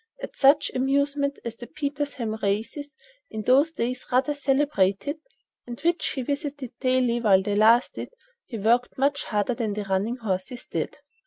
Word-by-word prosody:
At - - -8
such 285 +2 +4
amusements 280 +2 0
as 230 -1 -5
the 240 - -9
Petersham 285 -6 -3
races, 230 +9 -2 0.3
in 215 - -5
those 275 +7 +4
days 255 -3 -3
rather 260 +4 +2
celebrated, 280 - +1 0.5
and 240 0 -7
which 340 +2 0
he 260 - -2
visited 280 -2 -4
daily 255 -2 +1
while 195 -4 +4
they 205 +1 -1
lasted, 225 +4 +3 0.4
he 235 - -6
worked 235 +4 +1
much 280 +2 +1
harder 210 +2 0
than 230 -4 -2
the 210 0 -3
running 195 +4 -1
horses 220 +2 -4
did." - - -4
255 Hz, 155 wpm, -25 LUFS, 220-285 Hz, 0.5 s, such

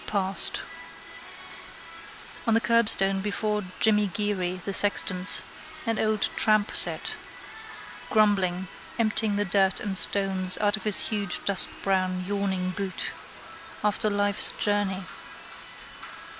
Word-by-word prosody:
Passed. 195 -2 -3 1.9
On 225 - +2
the - - +4
curbstone 205 -5 +3
before 210 +1 -3 0.2
Jimmy 210 -2 +2
Geary, 190 -3 -3
the 185 +2 -7
sexton's, 185 -2 +2 0.4
an 225 -1 -2
old 215 -1 -1
tramp 215 -1 +1
sat, - - +2 1.0
grumbling, 190 -4 0 0.3
emptying 220 -2 0
the 205 0 -1
dirt 190 0 0
and 200 -2 -5
stones 190 -1 +5
out 205 0 0
of 215 - -12
his 210 -2 +2
huge 200 -4 -3
dustbrown 185 -1 0
yawning 190 -2 -3
boot. 195 0 -5 0.7
After 210 +1 0
life's 205 0 +3
journey. 205 -2 -2
200 Hz, 105 wpm, -25 LUFS, 190-210 Hz, 1.9 s, stones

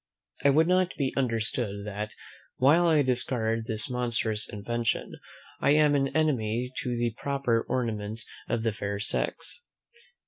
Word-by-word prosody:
I 140 - +6
would 155 +4 +4
not 185 0 +2
be 135 -3 0
understood 115 -4 -1
that, 105 +1 -5 0.4
while 155 +7 +5
I 155 -3 +4
discard 115 -3 0
this 110 -1 +3
monstrous 120 -3 -1
invention, 115 +3 -2 0.5
I 145 - +4
am 150 -1 +5
an 135 -1 +2
enemy 125 -5 0
to 125 -2 -2
the 120 -1 0
proper 135 -5 +1
ornaments 110 -3 -2 0.2
of 115 -1 0
the 115 -2 +1
fair 100 -1 -3
sex. 110 - -1
120 Hz, 140 wpm, -28 LUFS, 110-140 Hz, 0.5 s, I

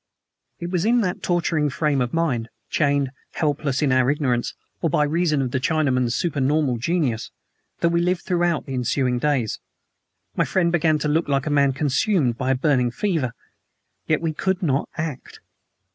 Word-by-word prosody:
It 170 +1 -5
was 180 -2 0
in 235 +3 +3
that 185 -3 -2
torturing 165 -4 +1
frame 150 -2 0
of 120 -1 -1
mind 135 -9 0 0.2
chained, 140 -3 +1 0.2
helpless, 145 -2 0
in 140 - +2
our 130 0 +3
ignorance, 130 -5 0 0.3
or 165 - +1
by 150 - +2
reason 155 -1 +1
of 125 - -3
the 130 - 0
Chinaman's 130 -6 +1
supernormal 145 -4 +1
genius 135 -5 -1 0.5
that 170 - +3
we 170 0 +1
lived 180 0 0
throughout 175 -3 0
the 135 - -6
ensuing 125 0 0
days. 130 -6 0 0.8
My - - +2
friend 175 -3 +1
began 160 -2 +2
to 150 - -2
look 160 +3 +1
like 140 -2 0
a 155 - -1
man 140 -2 +3
consumed 140 - +1
by 130 +2 -2
a 130 - +3
burning 130 -2 +2
fever. 150 - -1 0.7
Yet, 155 0 +1
we 165 -1 -1
could 190 +4 -1
not 140 -3 0
act. 155 -5 -5
150 Hz, 175 wpm, -23 LUFS, 130-170 Hz, 0.8 s, in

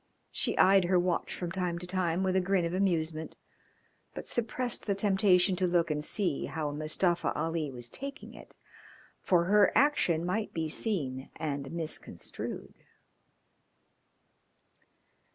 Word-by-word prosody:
She - - -1
eyed 190 -1 +6
her 180 +1 +3
watch 175 -1 0
from 175 -2 -4
time 180 -2 -2
to 175 - -6
time 180 -1 0
with 190 -1 +1
a 190 - +4
grin 185 -1 +1
of 170 - -3
amusement, 165 -4 -1 0.8
but - - -6
suppressed 240 0 -1
the 200 - +1
temptation 195 -2 +3
to 185 0 +1
look 170 -2 +2
and 150 0 -2
see 175 -3 -1
how 150 +1 -3
Mustafa 155 +4 0
Ali 165 -2 -1
was 120 -2 -6
taking 275 - -8
it, - - -14 0.7
for 175 -2 +3
her 205 +4 +4
action 180 - +3
might 210 +4 -2
be 160 -1 -1
seen 145 - -2
and 140 -3 -4
misconstrued. 165 -2 -6
175 Hz, 135 wpm, -30 LUFS, 160-195 Hz, 0.8 s, eyed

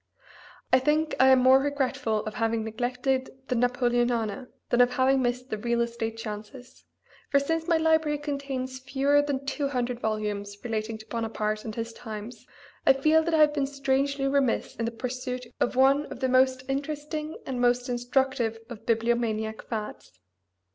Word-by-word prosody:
I 255 - +7
think 305 +3 +1
I 260 - +7
am 265 0 +7
more 260 +1 +7
regretful 265 -6 -1
of 215 - -4
having 225 0 0
neglected 250 +4 -1 0.2
the 250 - +1
Napoleonana 240 -2 +1 0.2
than 240 - +4
of 245 0 +4
having 265 +1 +3
missed 250 +1 -2
the 215 - -2
real 235 +2 0
estate 235 -1 -2
chances, 220 +3 -8 0.4
for 280 - +4
since 325 +3 -1
my 335 -2 +4
library 320 -2 +2
contains 275 -3 -4
fewer 280 +2 +2
than 280 -2 -3
two 280 +1 -1
hundred 250 -3 -2
volumes 210 -2 -3
relating 220 -1 -3
to 220 - -13
Bonaparte 215 -2 -2
and 220 -1 -5
his 230 0 -4
times 220 0 -8 0.4
I - - +6
feel 310 +4 +4
that 325 0 0
I 310 - +4
have 300 -1 +5
been 280 -2 0
strangely 275 0 0
remiss 275 -3 +1
in 230 - -2
the 230 - -2
pursuit 250 +1 -4
of 240 - 0
one 275 +3 +4
of - - -8
the 260 - +1
most 255 0 +3
interesting 300 +3 -3
and 250 -2 -3
most 245 +1 +2
instructive 245 -1 0
of 225 - -10
bibliomaniac 225 -1 0
fads. 210 - -7
250 Hz, 170 wpm, -27 LUFS, 230-275 Hz, 0.4 s, I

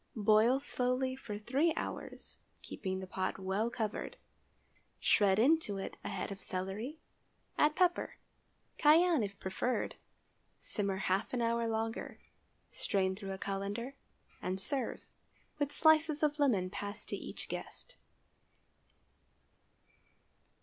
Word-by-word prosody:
Boil 220 +4 +5
slowly 260 -1 0
for 215 -6 -6
three 275 +10 +1
hours, - - -6 0.2
keeping 190 -1 -4
the - - -5
pot 185 0 -2
well 195 +4 0
covered; 225 -3 -3 0.8
shred 195 -2 +4
into 255 -3 +3
it 195 - -5
a - - -3
head 195 0 -3
of 195 0 -7
celery, 195 - -3 0.6
add 300 0 +3
pepper—cayenne, 345 -2 +2
if 200 -1 -4
preferred—simmer 200 -1 -4
half 190 +3 +1
an 245 - 0
hour 230 0 +1
longer, 225 0 -2 0.5
strain 190 -1 0
through 195 -1 -6
a - - -5
cullender, 200 +6 -3 0.5
and 185 +1 -2
serve, 270 +7 -2 0.6
with 290 -1 0
slices 315 -1 +4
of 300 0 +2
lemon 205 -11 +2
passed 205 +1 -5
to - - -1
each - - -7
guest. - - -6
220 Hz, 115 wpm, -34 LUFS, 195-275 Hz, 0.8 s, Boil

